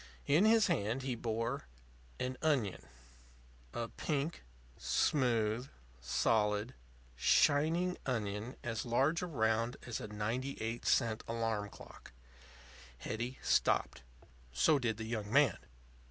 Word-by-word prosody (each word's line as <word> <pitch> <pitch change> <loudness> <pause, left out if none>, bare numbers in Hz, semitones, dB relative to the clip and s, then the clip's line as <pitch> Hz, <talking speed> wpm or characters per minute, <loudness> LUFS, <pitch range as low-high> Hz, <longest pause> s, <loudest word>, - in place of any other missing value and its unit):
In 155 +8 +4
his 220 -1 +6
hand 110 +6 0
he 130 -1 -1
bore 115 - -3 0.5
an 130 0 -2
onion 135 -12 0 0.8
a 115 -1 -3
pink, 145 - -3 0.3
smooth, 120 -2 +1 0.3
solid, 105 - +1 0.4
shining 160 - +3
onion 110 -1 -2
as 115 -2 -2
large 135 +7 +2
around 115 -8 0
as 125 0 -4
a 105 - -5
ninety 115 +6 -3
eight 115 +1 -3
cent 115 -3 +2
alarm 115 -3 -1
clock. - - -13 0.8
Hetty 120 - -4
stopped. - - +2 0.5
So 70 - +3
did 115 -4 -1
the 110 - -5
young 110 -2 -4
man. 140 -5 +4
115 Hz, 110 wpm, -34 LUFS, 110-135 Hz, 0.8 s, his